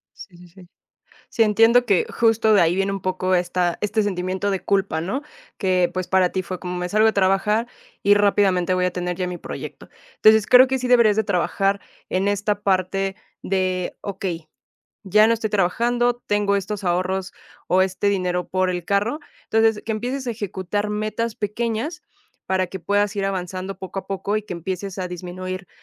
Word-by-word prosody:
Sí, 180 Hz, -3 st, -13 dB
sí, 175 Hz, 0 st, -15 dB
sí. 180 Hz, 0 st, -17 dB, 0.6 s
Sí, 225 Hz, -, +3 dB
entiendo 225 Hz, +3 st, +4 dB
que 200 Hz, -5 st, +2 dB
justo 225 Hz, -1 st, +3 dB
de 190 Hz, -, +5 dB
ahí 165 Hz, +1 st, +3 dB
viene 195 Hz, +1 st, 0 dB
un 195 Hz, -1 st, -4 dB
poco 185 Hz, 0 st, 0 dB
esta 175 Hz, 0 st, 0 dB
este 210 Hz, +1 st, +1 dB
sentimiento 190 Hz, 0 st, -2 dB
de 190 Hz, -3 st, -1 dB
culpa, 195 Hz, -4 st, 0 dB
¿no?, 200 Hz, -, -3 dB, 0.4 s
que 185 Hz, -2 st, +2 dB
pues 185 Hz, -1 st, -3 dB
para 185 Hz, -1 st, +3 dB
ti 190 Hz, -, -1 dB
fue 185 Hz, 0 st, -6 dB
como: 180 Hz, -1 st, -5 dB
"Me 180 Hz, 0 st, -3 dB
salgo 215 Hz, +2 st, +3 dB
de 220 Hz, -, +4 dB
trabajar 200 Hz, +4 st, +2 dB, 0.3 s
y 205 Hz, +1 st, +5 dB
rápidamente 195 Hz, -3 st, +2 dB
voy 180 Hz, 0 st, +1 dB
a 180 Hz, -, 0 dB
tener 180 Hz, 0 st, -3 dB
ya 180 Hz, 0 st, -2 dB
mi 180 Hz, -1 st, -5 dB
proyecto". -, -, -8 dB, 0.3 s
Entonces 215 Hz, -1 st, +5 dB
creo 255 Hz, +1 st, +8 dB
que 265 Hz, 0 st, -1 dB
sí 250 Hz, -, -2 dB
deberías 235 Hz, -4 st, +5 dB
de 220 Hz, -, +3 dB
trabajar 195 Hz, +1 st, 0 dB, 0.3 s
en 190 Hz, +2 st, 0 dB
esta 205 Hz, 0 st, 0 dB
parte 195 Hz, 0 st, 0 dB, 0.3 s
de 185 Hz, -1 st, -1 dB
okey: 185 Hz, -5 st, -5 dB, 0.6 s
"Ya 210 Hz, +2 st, +5 dB
no 230 Hz, -, +4 dB
estoy 220 Hz, -1 st, -2 dB
trabajando. 240 Hz, +5 st, +1 dB
Tengo 205 Hz, -1 st, +1 dB
estos 200 Hz, +1 st, -3 dB
ahorros 185 Hz, +1 st, -1 dB, 0.3 s
o 185 Hz, +1 st, +3 dB
este 190 Hz, +2 st, 0 dB
dinero 180 Hz, -2 st, -1 dB
por 185 Hz, 0 st, 0 dB
el 175 Hz, -2 st, -3 dB
carro". 210 Hz, +9 st, 0 dB, 0.3 s
Entonces 225 Hz, -1 st, +2 dB
que 225 Hz, -, -3 dB
empieces 250 Hz, +4 st, -3 dB
a 240 Hz, -, 0 dB
ejecutar 205 Hz, -1 st, -3 dB
metas 215 Hz, +2 st, -2 dB
pequeñas 230 Hz, -, -3 dB, 0.4 s
para 185 Hz, -1 st, +1 dB
que 190 Hz, +2 st, -7 dB
puedas 205 Hz, +4 st, 0 dB
ir 200 Hz, -1 st, -1 dB
avanzando 185 Hz, 0 st, -4 dB
poco 190 Hz, 0 st, -7 dB
a -, -, -12 dB
poco 195 Hz, +2 st, -2 dB
y 215 Hz, -, -4 dB
que 210 Hz, -, -7 dB
empieces 185 Hz, +3 st, -5 dB
a 180 Hz, -, -2 dB
disminuir, 185 Hz, +1 st, -6 dB
195 Hz, 190 wpm, -22 LUFS, 185-215 Hz, 0.6 s, creo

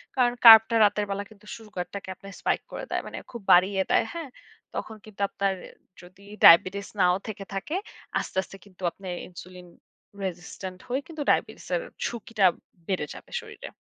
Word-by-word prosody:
কারণ 245 Hz, -2 st, +3 dB
কার্বটা 225 Hz, 0 st, +10 dB
রাতের 205 Hz, 0 st, +1 dB
বেলা 200 Hz, +1 st, -2 dB
কিন্তু 215 Hz, -1 st, -19 dB
সুগার 210 Hz, -5 st, -7 dB
টাকে 200 Hz, -1 st, -6 dB
আপনার 195 Hz, +2 st, -12 dB
spike -, -, -1 dB
করে -, -, -6 dB
দেয়। -, -, 0 dB
মানে -, -, -7 dB
খুব 235 Hz, -3 st, -8 dB
বাড়িয়ে 190 Hz, +2 st, +5 dB
দেয়। -, -, +4 dB
হ্যাঁ? 330 Hz, -5 st, -6 dB, 0.5 s
তখন 220 Hz, -, -5 dB
কিন্তু 205 Hz, -2 st, -11 dB
আপনার 195 Hz, -1 st, 0 dB, 0.5 s
যদি 180 Hz, +3 st, -17 dB, 0.2 s
ডায়াবেটিস 185 Hz, +4 st, +7 dB
নাও 180 Hz, -1 st, +5 dB
থেকে 205 Hz, -2 st, -6 dB
থাকে 195 Hz, -, -3 dB, 0.4 s
আস্তে, -, -, -6 dB
আস্তে 195 Hz, -, -12 dB
কিন্তু 190 Hz, -2 st, -20 dB
আপনে 195 Hz, -, -12 dB, 0.2 s
ইনসুলিন 180 Hz, 0 st, -12 dB, 0.6 s
রেসিস্টেন্ট 185 Hz, +1 st, -6 dB
হয়ে 260 Hz, +3 st, -1 dB
কিন্তু 320 Hz, -3 st, -7 dB
ডায়াবেটিসের -, -, 0 dB, 0.2 s
ঝুঁকিটা 230 Hz, -3 st, -1 dB, 0.4 s
বেড়ে 185 Hz, -6 st, -1 dB
যাবে -, -, -13 dB
শরীরে। -, -, -10 dB
200 Hz, 160 wpm, -26 LUFS, 185-225 Hz, 0.6 s, কার্বটা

